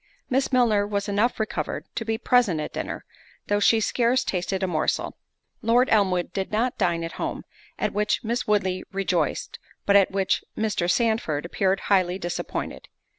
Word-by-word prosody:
Miss 265 Hz, +2 st, +1 dB
Milner 225 Hz, -5 st, +3 dB
was 200 Hz, 0 st, -2 dB
enough 210 Hz, +5 st, +1 dB
recovered 220 Hz, -, -3 dB
to -, -, -3 dB
be 225 Hz, 0 st, -1 dB
present 230 Hz, -10 st, +3 dB
at 150 Hz, -, -4 dB
dinner, -, -, -5 dB, 0.4 s
though 205 Hz, 0 st, +1 dB
she 225 Hz, +2 st, +4 dB
scarce 245 Hz, +3 st, +2 dB
tasted 190 Hz, +1 st, -2 dB
a -, -, +1 dB
morsel. 160 Hz, -3 st, -1 dB, 0.5 s
Lord 240 Hz, +2 st, +3 dB
Elmwood 185 Hz, -5 st, +2 dB
did 190 Hz, -1 st, -3 dB
not 235 Hz, +4 st, 0 dB
dine 170 Hz, -1 st, +1 dB
at 165 Hz, -, -4 dB
home, -, -, -3 dB, 0.3 s
at -, -, -1 dB
which 210 Hz, +3 st, 0 dB
Miss 235 Hz, +2 st, -2 dB
Woodley 190 Hz, -3 st, +1 dB
rejoiced, 180 Hz, -5 st, -1 dB, 0.3 s
but 200 Hz, -, +4 dB
at 195 Hz, -2 st, +6 dB
which 195 Hz, -1 st, 0 dB
Mr. 210 Hz, -5 st, 0 dB
Sandford 220 Hz, -10 st, +1 dB
appeared 190 Hz, +2 st, 0 dB
highly 185 Hz, -2 st, +2 dB
disappointed. 175 Hz, -2 st, -4 dB
205 Hz, 165 wpm, -25 LUFS, 185-225 Hz, 0.5 s, at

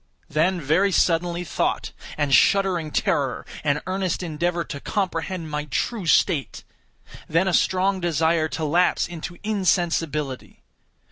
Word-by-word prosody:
Then, 175 Hz, +5 st, +1 dB
very 165 Hz, +7 st, +2 dB
suddenly, 175 Hz, 0 st, +1 dB
thought, 155 Hz, -, -2 dB, 0.3 s
and 145 Hz, -2 st, 0 dB
shuddering 185 Hz, -2 st, +3 dB
terror, 140 Hz, -2 st, 0 dB, 0.2 s
and 150 Hz, 0 st, 0 dB
earnest 185 Hz, -1 st, -2 dB
endeavor 170 Hz, +1 st, -1 dB
to 140 Hz, -, -7 dB
comprehend 180 Hz, -2 st, -3 dB
my 150 Hz, 0 st, -2 dB
true 185 Hz, -, -2 dB
state. 145 Hz, -3 st, +2 dB, 0.7 s
Then 165 Hz, +4 st, +2 dB
a 190 Hz, -, +1 dB
strong 185 Hz, +3 st, +2 dB
desire 165 Hz, -1 st, +1 dB
to 160 Hz, 0 st, -4 dB
lapse 175 Hz, +5 st, +2 dB
into 175 Hz, 0 st, -7 dB
insensibility. 165 Hz, -9 st, -1 dB
170 Hz, 125 wpm, -23 LUFS, 155-185 Hz, 0.7 s, shuddering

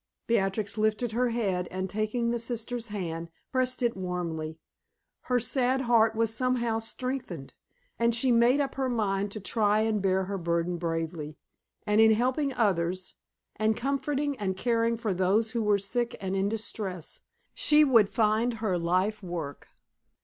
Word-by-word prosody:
Beatrix 210 Hz, -1 st, 0 dB
lifted 215 Hz, +2 st, +1 dB
her 245 Hz, +2 st, +1 dB
head 195 Hz, -7 st, -1 dB
and 185 Hz, +1 st, -3 dB
taking 215 Hz, +4 st, -1 dB
the 240 Hz, -, -1 dB
sister's 235 Hz, 0 st, -4 dB
hand, 170 Hz, -5 st, -4 dB, 0.2 s
pressed 255 Hz, 0 st, 0 dB
it 235 Hz, -1 st, +1 dB
warmly. 170 Hz, -4 st, -4 dB, 0.7 s
Her 250 Hz, -1 st, +2 dB
sad 255 Hz, +2 st, +1 dB
heart 225 Hz, -3 st, +3 dB
was 225 Hz, 0 st, +1 dB
somehow 240 Hz, -2 st, 0 dB
strengthened, 255 Hz, +3 st, -5 dB, 0.5 s
and 235 Hz, 0 st, +3 dB
she 250 Hz, +2 st, +2 dB
made 240 Hz, +4 st, +4 dB
up 275 Hz, -2 st, 0 dB
her 265 Hz, -1 st, -1 dB
mind 205 Hz, -4 st, 0 dB
to 215 Hz, -, -5 dB
try 210 Hz, +1 st, +2 dB
and 220 Hz, -2 st, +1 dB
bear 190 Hz, 0 st, +2 dB
her 195 Hz, +1 st, -4 dB
burden 170 Hz, +1 st, 0 dB
bravely, 165 Hz, -2 st, -3 dB, 0.5 s
and 210 Hz, +1 st, +4 dB
in 220 Hz, 0 st, +7 dB
helping 260 Hz, +5 st, +1 dB
others, 185 Hz, -6 st, 0 dB, 0.4 s
and 215 Hz, 0 st, +1 dB
comforting 280 Hz, +2 st, -1 dB
and 190 Hz, -2 st, -2 dB
caring 230 Hz, +1 st, +1 dB
for 220 Hz, -4 st, -1 dB
those 195 Hz, +5 st, +2 dB
who 235 Hz, -, -1 dB
were 210 Hz, -1 st, +3 dB
sick 235 Hz, +5 st, -2 dB
and 190 Hz, 0 st, -3 dB
in 195 Hz, +1 st, +1 dB
distress, 205 Hz, -5 st, -5 dB, 0.3 s
she 300 Hz, 0 st, +5 dB
would 230 Hz, -8 st, +5 dB
find 225 Hz, +2 st, +1 dB
her 210 Hz, -5 st, -1 dB
life 185 Hz, +6 st, 0 dB
work. 170 Hz, -6 st, -6 dB
220 Hz, 155 wpm, -28 LUFS, 190-240 Hz, 0.7 s, in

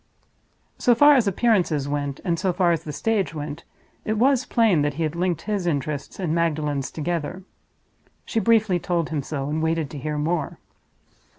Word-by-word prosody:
So 245 Hz, -2 st, +4 dB
far 290 Hz, +5 st, +7 dB
as 250 Hz, -6 st, +3 dB
appearances 180 Hz, -, +1 dB
went, 145 Hz, -1 st, -3 dB
and 170 Hz, -2 st, 0 dB
so 190 Hz, -, +1 dB
far 175 Hz, -1 st, +2 dB
as 165 Hz, -, -1 dB
the 150 Hz, -, -4 dB
stage 200 Hz, +2 st, -1 dB
went, 150 Hz, +1 st, -6 dB, 0.4 s
it 215 Hz, 0 st, -1 dB
was 260 Hz, +2 st, +3 dB
plain 220 Hz, -, +3 dB
that 145 Hz, -1 st, -1 dB
he 165 Hz, -, -2 dB
had 155 Hz, +1 st, -2 dB
linked 175 Hz, -2 st, -1 dB
his 205 Hz, -4 st, -2 dB
interests 145 Hz, -1 st, -3 dB
and 175 Hz, -5 st, -1 dB
Magdalen's 150 Hz, -4 st, 0 dB
together. 170 Hz, +3 st, -3 dB, 0.8 s
She 225 Hz, -, -1 dB
briefly 220 Hz, -5 st, +3 dB
told 170 Hz, -2 st, -1 dB
him 155 Hz, -3 st, -2 dB
so, 140 Hz, 0 st, -4 dB
and 155 Hz, +2 st, -2 dB
waited 160 Hz, -2 st, -1 dB
to 145 Hz, -, -6 dB
hear 150 Hz, +2 st, -3 dB
more. 155 Hz, 0 st, -1 dB
165 Hz, 180 wpm, -23 LUFS, 150-195 Hz, 0.8 s, far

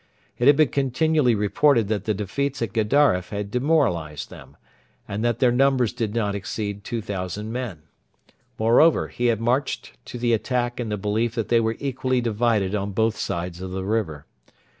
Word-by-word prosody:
It 120 Hz, -, +3 dB
had 145 Hz, -, +8 dB
been 155 Hz, -4 st, +4 dB
continually 140 Hz, -1 st, +2 dB
reported 115 Hz, +3 st, +2 dB
that 105 Hz, -3 st, -1 dB
the 110 Hz, -, 0 dB
defeats 135 Hz, +8 st, -2 dB
at 105 Hz, -3 st, -4 dB
Gedaref 110 Hz, -4 st, +2 dB
had 100 Hz, -1 st, -4 dB
demoralised 120 Hz, -, 0 dB
them, -, -, -13 dB, 0.5 s
and 100 Hz, +3 st, -3 dB
that 120 Hz, -1 st, +1 dB
their 125 Hz, 0 st, +3 dB
numbers 130 Hz, -2 st, +2 dB
did 115 Hz, -2 st, -3 dB
not 105 Hz, -3 st, 0 dB
exceed 100 Hz, 0 st, -4 dB
2,000 105 Hz, -2 st, -4 dB
men. 115 Hz, -11 st, -5 dB, 0.7 s
Moreover, 120 Hz, +9 st, +4 dB
he 120 Hz, -, -1 dB
had 115 Hz, -2 st, +1 dB
marched 125 Hz, +4 st, -1 dB
to 120 Hz, -, -7 dB
the 120 Hz, -1 st, +1 dB
attack 120 Hz, +2 st, -1 dB
in 120 Hz, -3 st, -3 dB
the 105 Hz, -, -2 dB
belief 110 Hz, +3 st, -1 dB
that 115 Hz, -3 st, -2 dB
they 120 Hz, -, +4 dB
were 110 Hz, 0 st, -1 dB
equally 130 Hz, -2 st, -1 dB
divided 110 Hz, -4 st, 0 dB
on 100 Hz, -1 st, -2 dB
both 110 Hz, +1 st, +1 dB
sides 85 Hz, +1 st, -4 dB
of 95 Hz, -, -5 dB
the 95 Hz, 0 st, -4 dB
river. 95 Hz, -9 st, -2 dB
115 Hz, 175 wpm, -23 LUFS, 100-125 Hz, 0.7 s, had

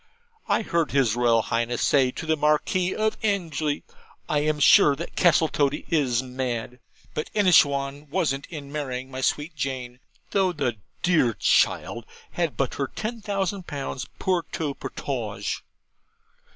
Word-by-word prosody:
I -, -, +2 dB
heard 170 Hz, -5 st, 0 dB
his 130 Hz, -5 st, +2 dB
Royal 120 Hz, -2 st, +3 dB
Highness 115 Hz, +2 st, -1 dB
say 135 Hz, -3 st, +4 dB
to 160 Hz, -, -6 dB
the 160 Hz, 0 st, +2 dB
Marquis 155 Hz, +5 st, +1 dB
of 215 Hz, 0 st, 0 dB
Anglesey, 165 Hz, -8 st, -1 dB, 0.4 s
"I 150 Hz, -, +1 dB
am 150 Hz, 0 st, 0 dB
sure 145 Hz, 0 st, +7 dB
Castletoddy 150 Hz, -2 st, +1 dB
is 130 Hz, -6 st, +2 dB
mad!" 125 Hz, -1 st, -4 dB, 0.3 s
but 150 Hz, -, -3 dB
Inishowan 145 Hz, -7 st, +3 dB
wasn't 140 Hz, -2 st, -1 dB
in 145 Hz, -4 st, -8 dB
marrying 130 Hz, -3 st, -4 dB
my 130 Hz, 0 st, -5 dB
sweet 150 Hz, +4 st, -1 dB
Jane, 130 Hz, -2 st, -4 dB, 0.3 s
though 190 Hz, -2 st, +2 dB
the 120 Hz, -8 st, -1 dB, 0.3 s
dear 155 Hz, -, +3 dB
child -, -, +2 dB, 0.3 s
had -, -, -2 dB
but -, -, 0 dB
her -, -, +1 dB
ten 230 Hz, +1 st, -5 dB
thousand 195 Hz, -3 st, -2 dB
pounds 135 Hz, -2 st, -4 dB
POUR 185 Hz, -2 st, +1 dB
TOUT 145 Hz, -4 st, -3 dB
POTAGE!' -, -, -4 dB
145 Hz, 140 wpm, -25 LUFS, 130-170 Hz, 0.4 s, sure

